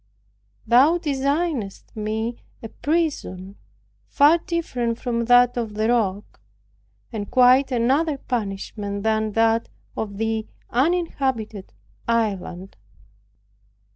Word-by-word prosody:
Thou 275 +8 +5
designedst 280 - -2
me 220 +2 -3 0.2
a 225 - -6
prison 280 - -2 0.5
far 300 +4 +5
different 250 -10 -2
from 235 -1 -2
that 245 0 +5
of 225 -3 -3
the 215 +1 0
rock, 210 -4 -1 0.7
and 205 -2 -4
quite 255 +2 +5
another 275 +6 +1
banishment 200 -3 -4
than 220 -1 0
that 225 +1 +2 0.3
of 205 -2 -4
the 220 0 -1 0.2
uninhabited 265 - -1 0.4
island. 195 -5 -2
230 Hz, 95 wpm, -23 LUFS, 215-270 Hz, 0.7 s, Thou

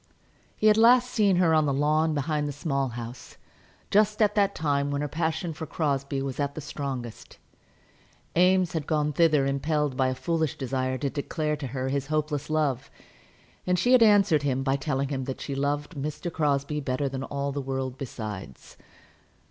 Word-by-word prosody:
He - - -3
had 215 0 +6
last 245 +2 +5
seen 205 -4 +3
her 175 -2 +3
on 155 -1 +3
the 140 - +1
lawn 155 +2 +2
behind 150 +1 -1
the - - -3
Small 140 -1 -1
House, 120 0 -8 0.5
just 210 +1 +3
at 210 -2 +3
that 200 -2 +2
time 145 -2 0
when 145 0 -1
her 150 - -1
passion 160 +2 -2
for 160 +1 -7
Crosbie 140 -3 -1
was 135 0 -5
at 140 0 -1
the - - -5
strongest. 135 -5 -6 1.0
Eames 180 0 +3
had 160 -3 -3
gone 150 -1 0
thither 155 -3 +3
impelled 145 +1 0
by 130 0 +2
a 130 - -1
foolish 160 0 -1
desire 130 -1 -2
to 140 0 -2
declare 150 +1 -2
to 145 -2 -5
her 130 +1 -3
his 140 0 -2
hopeless 150 -1 -2
love, 145 -4 0 0.8
and 180 0 +2
she 245 - +2
had 255 -2 +7
answered 200 -8 +5
him 135 -2 -1
by 135 0 +1
telling 135 -1 -2
him 135 -2 -3
that 130 -1 -5
she 140 - -5
loved 145 +2 -1
Mr. 150 +4 -4
Crosbie 145 -1 0
better 135 +1 -1
than 135 0 -4
all 140 +1 -3
the 140 +1 -3
world 130 -1 -3
besides. 105 - -7
145 Hz, 185 wpm, -26 LUFS, 135-160 Hz, 1.0 s, had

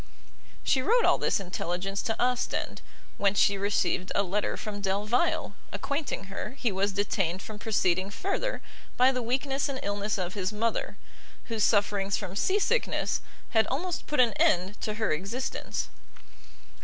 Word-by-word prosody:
She 260 - +3
wrote 470 - +4
all - - +4
this - - +2
intelligence 190 +1 -2
to 225 - -2
Ostend, 250 0 0 0.4
whence 200 0 +2
she 200 - +5
received 195 -2 0
a 200 - +4
letter 205 +2 -1
from 205 -1 -5
Delvile, 205 - +1 0.2
acquainting 280 -6 -2
her 195 +6 -6
he 240 -5 +1
was 195 +1 +1
detained 190 -2 0
from 215 -2 -8
proceeding 190 -4 +1
further 395 - -2 0.3
by 255 +1 +6
the 255 -1 -2
weakness 270 +4 0
and 265 -1 -3
illness 205 +1 -1
of 185 -1 -2
his 195 -1 -1
mother, 225 +2 -1 0.5
whose 225 -2 0
sufferings 200 -2 +2
from 185 - -5
seasickness 410 - +1 0.3
had 220 -1 +4
almost 340 +6 -2
put 300 - -1
an 240 -4 +5
end 185 +4 +2
to 215 - -2
her 220 0 0
existence. 200 +12 -2
210 Hz, 150 wpm, -29 LUFS, 195-250 Hz, 0.5 s, by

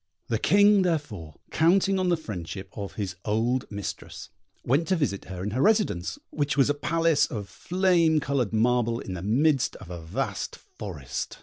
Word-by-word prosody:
The - - 0
King, 205 0 +5
therefore, 140 - -2 0.2
counting 190 +4 +3
on 185 -1 +1
the 175 - +3
friendship 95 - -7
of 100 -2 -6
his 95 -4 -4
old 115 +4 0
mistress, 100 -2 -6 0.4
went 145 +7 +2
to 190 - +2
visit 140 - -1
her 90 0 -6
in 105 - -2
her 125 +5 -1
residence, 205 - +2
which 145 -2 -1
was 140 +1 +4
a - - +1
palace 155 0 +2
of 105 -4 -5
flame 175 - +2
coloured 140 -7 -1
marble 115 +1 +2
in 95 - -6
the 90 - -5
midst 135 - +2
of 90 -4 -11
a 85 -1 -6
vast 80 +1 -3
forest. 75 -12 -7
130 Hz, 175 wpm, -26 LUFS, 100-165 Hz, 0.4 s, King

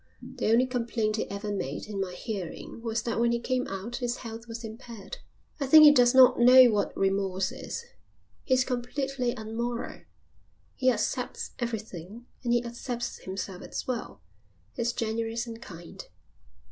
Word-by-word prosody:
The 250 -1 -4
only 240 +3 +5
complaint 230 -3 -1
he - - -2
ever 200 +1 -4
made 145 -8 -3
in 205 -2 -4
my 185 -2 -3
hearing 195 +2 -6
was 225 -1 -2
that 230 -1 -1
when 235 0 +3
he 235 - +1
came 255 +1 -1
out 195 +5 -5
his 245 -2 -1
health 230 0 -8
was 230 0 -7
impaired. 230 - -8 0.4
I 275 - -1
think 310 +3 +9
he 300 - +11
does 245 -2 +5
not 260 -2 +7
know 250 0 +8
what 205 -1 -1
remorse 195 -1 0
is. 470 - -6 0.6
He 260 - +3
is 255 0 +2
completely 255 0 -2
unmoral. 235 +2 -4 0.7
He 260 -1 +3
accepts 245 +2 -2
everything 220 -2 -5 0.2
and 240 - 0
he 240 0 +2
accepts 240 0 -4
himself 190 -1 -6
as - - -5
well. 240 - -5 0.5
He's 235 +1 0
generous 230 +1 -2
and 230 -1 -8
kind." 170 -5 -10
235 Hz, 160 wpm, -28 LUFS, 215-245 Hz, 0.7 s, he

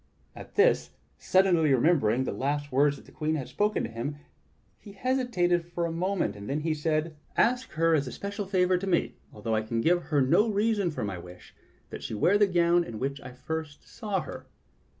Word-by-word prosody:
At - - -11
this, 435 +4 +3 0.3
suddenly 180 -5 +3
remembering 130 -3 +3
the - - -2
last 145 +2 -2
words 140 +2 +3
that - - -16
the - - -17
Queen 155 0 -1
had 135 -5 -4
spoken 210 +1 0
to - - -3
him, 120 +6 -4 0.6
he 205 - -13
hesitated 200 -8 +1
for 170 0 -3
a 165 - -2
moment, 180 - -1
then 145 +3 -1
he 160 0 0
said: 155 +1 -1 0.2
"Ask 250 +2 +2
her 165 +1 +2
as 145 -4 +1
a - - -5
special 200 0 -5
favor 185 -1 +2
to 195 - -5
me, 175 -3 +1 0.2
although 110 +1 -4
I 110 - +2
can 115 +1 -3
give 175 +8 +2
her 150 -2 +1
no 140 - +3
reason 205 -2 +1
for 150 - -4
my 100 -4 -4
wish, 90 +1 -13 0.4
that - - -7
she 110 - -5
wear 185 - +3
the 205 - +5
gown 175 -1 +3
in 115 -9 -7
which 135 +4 -3
I 125 - -9
first 145 +4 -6
saw 205 -5 -3
her." - - -9
165 Hz, 205 wpm, -28 LUFS, 135-190 Hz, 0.6 s, the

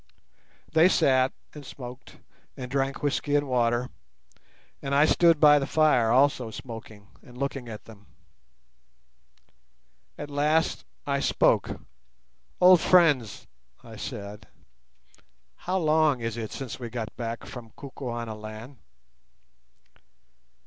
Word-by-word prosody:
They 160 +3 +6
sat 130 -5 +3 0.2
and 150 - -10
smoked 125 -1 -11 0.4
and 125 -1 -7
drank 135 0 -2
whisky 145 0 0
and 145 0 +1
water, 120 -1 0 0.9
and 140 0 -2
I 145 +2 +5
stood 165 -1 +4
by 150 -1 +7
the 135 - -3
fire 150 -8 +3
also 130 -1 +2
smoking 110 -3 -10
and 125 0 -15
looking 135 -2 -4
at 105 -1 -9
them. 105 -3 -16 2.1
At 145 0 -7
last 150 +3 0 0.2
I 140 -1 0
spoke. - - +1 0.8
"Old 180 -2 +7
friends," 150 - +3 0.4
I - - -12
said, 105 +1 -8 1.1
"how 185 +2 -3
long 155 -5 +2
is 115 -1 -4
it 110 -3 -5
since 130 -3 -7
we 120 -2 -6
got 115 -2 -6
back 115 -1 -5
from 120 -3 -10
Kukuanaland?" 115 -2 -7
130 Hz, 115 wpm, -26 LUFS, 115-145 Hz, 2.1 s, by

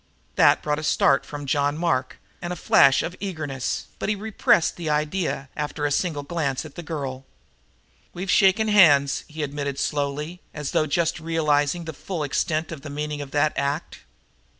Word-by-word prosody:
That - - +5
brought 150 0 0
a - - -6
start 140 -2 +3
from 145 -1 -6
John 145 +2 +1
Mark 135 -6 -1 0.2
and 175 0 -4
a - - -2
flash 135 -5 +5
of 175 - -4
eagerness, 155 -9 -3
but - - -2
he 210 - +1
repressed 205 -5 +2
the 165 -3 -4
idea, 150 -1 -1
after 150 0 -3
a 145 - 0
single 150 -1 -1
glance 140 -3 -2
at 150 - -10
the - - -7
girl. 140 -6 -5 0.9
"We've 185 +1 -3
shaken 210 +3 +4
hands," 145 -10 +5
he 155 0 -5
admitted 140 -1 -3
slowly, 150 +5 -2
as 150 -2 -4
though 155 - +1
just 165 +2 0
realizing 160 0 +1
the 160 - -5
full 170 +2 -4
extent 155 +3 -1
of 155 -4 -7
the 155 - -8
meaning 150 +1 -4
of 140 - -7
that 150 +2 +1
act. 140 +4 -2
150 Hz, 175 wpm, -24 LUFS, 140-170 Hz, 0.9 s, That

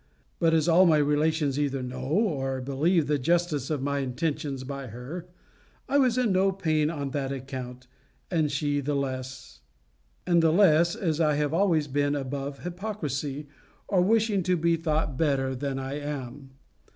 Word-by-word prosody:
But 165 -1 +3
as 160 0 +2
all 175 +2 +6
my 160 -2 +5
relations 150 -1 +1
either 135 -3 -1
know 125 +1 -6
or 140 -7 0
believe 145 +6 +1
the 145 0 0
justice 165 -1 0
of 150 -4 -2
my 140 0 0
intentions 140 +1 -2
by 140 0 -6
her, 130 - -8 0.6
I 285 - +3
was 255 -3 +3
in 245 -4 +2
no 190 +1 +3
pain 155 -5 0
on 140 -4 -4
that 135 -1 -2
account; 130 -2 -6 0.5
and 160 -4 +1
the 145 0 -1
less, 130 - -5 0.7
as 170 -1 +3
I 150 -2 +3
have 150 +1 0
always 165 -4 +2
been 145 +1 0
above 140 0 -4
hypocrisy, 155 - -4 0.4
or 185 -3 +2
wishing 215 0 +2
to 180 0 +1
be 170 +1 +2
thought 155 -4 -1
better 135 -4 +1
than 135 +1 -3
I 135 +2 -4
am. 140 -2 -6
150 Hz, 150 wpm, -27 LUFS, 135-170 Hz, 0.7 s, all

